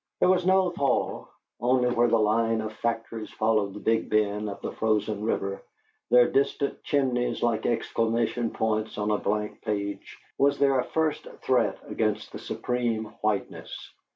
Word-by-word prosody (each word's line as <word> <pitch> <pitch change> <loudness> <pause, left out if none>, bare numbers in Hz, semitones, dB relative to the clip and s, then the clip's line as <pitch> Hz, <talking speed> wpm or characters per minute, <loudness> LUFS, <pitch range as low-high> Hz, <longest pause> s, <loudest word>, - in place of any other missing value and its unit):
There - - +4
was 185 -1 +3
no 190 -1 +4
thaw; 140 -6 -1 0.3
only 125 +1 +2
where 120 0 +3
the 115 0 +3
line 115 +1 +2
of 110 0 -5
factories 115 -1 -3
followed 105 -3 0
the - - -6
big 115 +1 0
bend 105 0 +1
of 100 - -7
the - - -3
frozen 105 -1 0
river, 100 -3 -1 0.5
their 120 0 +6
distant 140 +1 0
chimneys 130 -4 0
like 115 -2 +1
exclamation 115 0 0
points 110 -1 -1
on 105 0 0
a 105 - +1
blank 105 +1 -2
page, 100 -2 -4 0.2
was 140 0 +3
there 135 -2 +3
a - - +1
first 160 -1 -1 0.2
threat - - +2
against 110 -1 -1
the - - -7
supreme 115 -3 -2
whiteness. 105 -2 -3
115 Hz, 155 wpm, -27 LUFS, 105-125 Hz, 0.5 s, their